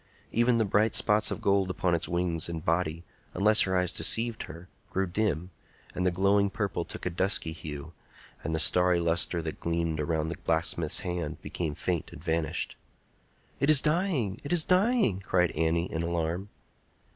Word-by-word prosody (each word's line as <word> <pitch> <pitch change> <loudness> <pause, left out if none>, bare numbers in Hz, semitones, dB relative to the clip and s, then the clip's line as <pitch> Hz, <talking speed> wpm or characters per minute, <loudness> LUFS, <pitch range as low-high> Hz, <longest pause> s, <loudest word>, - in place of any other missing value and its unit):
Even 120 +1 +3
the 110 - +2
bright 105 +2 +2
spots 105 -1 +3
of - - -4
gold 100 -1 +2
upon 90 -1 0
its 85 -1 -1
wings 85 -2 -1
and 80 -2 -6
body, 85 0 0 0.3
unless 105 +3 +5
her 95 -1 +2
eyes 90 -1 +1
deceived 115 0 +1
her, 85 +3 -11 0.2
grew 95 +1 0
dim, 90 -2 -2 0.4
and 90 0 -1
the - - +3
glowing 100 +2 +2
purple 100 -3 -2
took - - -9
a - - +1
dusky 90 -1 +1
hue, 80 -1 -8 0.5
and 80 0 -2
the - - -1
starry 90 +2 +3
lustre 85 0 0
that 80 -1 -5
gleamed 85 -2 -1
around 80 0 -1
the 85 - -5
blacksmith's 80 -1 +1
hand 90 -5 -4
became 80 -4 -4
faint 85 +1 -3
and 75 - -11
vanished. 80 -1 -2 0.8
"It 140 - +1
is 155 -3 +9
dying! 150 - 0
it 145 - -6
is 175 -3 +4
dying!" 185 - +2
cried 90 -3 +1
Annie, 80 +2 0
in 80 - -2
alarm. 85 +3 -2
90 Hz, 175 wpm, -28 LUFS, 80-100 Hz, 0.8 s, is